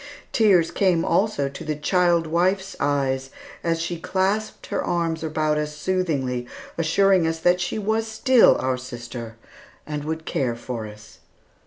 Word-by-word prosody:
Tears 195 -7 +4
came 180 -4 +2
also 195 -9 +1
to 140 - -8
the 155 0 -2
child 170 +2 +2
wife's 185 +4 0
eyes 135 -2 0 0.3
as 165 -1 0
she 170 0 -3
clasped 195 +5 -1
her - - -2
arms 165 -2 -1
about 155 -1 0
us 150 0 -4
soothingly, 145 -9 -1 0.3
assuring 175 +2 +3
us 165 0 -1
that 175 +2 +2
she 175 - -2
was 220 +2 0
still 240 +3 +5
our 130 0 -1
sister, 120 -2 -8 0.5
and 150 -1 -4
would 160 +1 -4
care 125 -4 -1
for 120 -2 -5
us. 105 +1 -14
160 Hz, 150 wpm, -23 LUFS, 140-185 Hz, 0.5 s, still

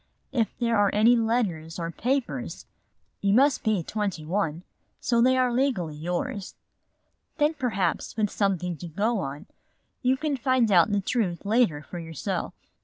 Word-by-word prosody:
If 235 -5 -1
there 235 -2 +1
are 205 -1 +4
any 225 +4 +6
letters 215 -9 0
or 165 -1 -3
papers, 260 +8 -2 0.6
you 200 0 +3
must 275 +2 +4
be 215 -6 +1
twenty 195 -5 -3
one, 170 -2 -1 0.4
so 235 -1 +2
they 260 +2 +4
are 250 -1 +2
legally 235 - 0
yours. 175 +4 -4 0.8
Then 300 +1 +3
perhaps 225 - -1
with 210 -2 +1
something 180 -4 0
to 175 - -7
go 205 +7 0
on, 140 -3 -5 0.6
you 260 +1 +2
can 300 -1 -1
find 250 -3 +2
out 180 +1 +5
the 205 -1 +1
truth 195 -4 -1
later 205 -9 +2
for 175 - -7
yourself. 165 -3 -4
210 Hz, 155 wpm, -26 LUFS, 175-245 Hz, 0.8 s, any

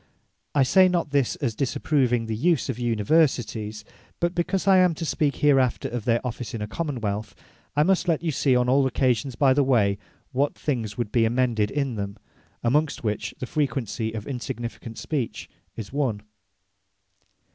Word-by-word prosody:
I 140 - +5
say 185 +7 +5
not 170 -4 -1
this, 140 -4 +1
as 130 -6 -2
disapproving 125 -1 +1
the 110 -1 -3
use 160 +4 +1
of 125 -2 -3
Universities: 115 -3 +1 0.3
but 175 0 0
because 180 +2 -1
I 190 -1 +7
am 180 -3 +4
to 165 - -4
speak 150 -2 0
hereafter 135 -4 +2
of 120 -3 -4
their 120 +1 +1
office 120 -2 -4
in 110 - -5
a - - -4
Common 145 +1 -3
wealth, 105 0 -3 0.4
I 150 - +4
must 185 +1 +2
let 165 -2 +1
you 165 - 0
see 135 -2 +2
on 125 0 +2
all 135 +1 +4
occasions 130 0 0
by 135 0 +4
the 140 +1 +3
way, 105 -7 +2 0.3
what 140 +2 0
things 115 -8 -3
would 120 -4 -2
be 115 - +3
amended 115 -2 +1
in 135 -4 -2
them; 100 0 -4 0.5
amongst 145 +5 +1
which 105 -2 -2
the - - -4
frequency 130 - -2
of 110 -2 -5
insignificant 120 -3 -6
Speech 135 -7 -3 0.3
is 110 +2 -7
one. 125 -8 -1
125 Hz, 175 wpm, -25 LUFS, 115-145 Hz, 0.5 s, I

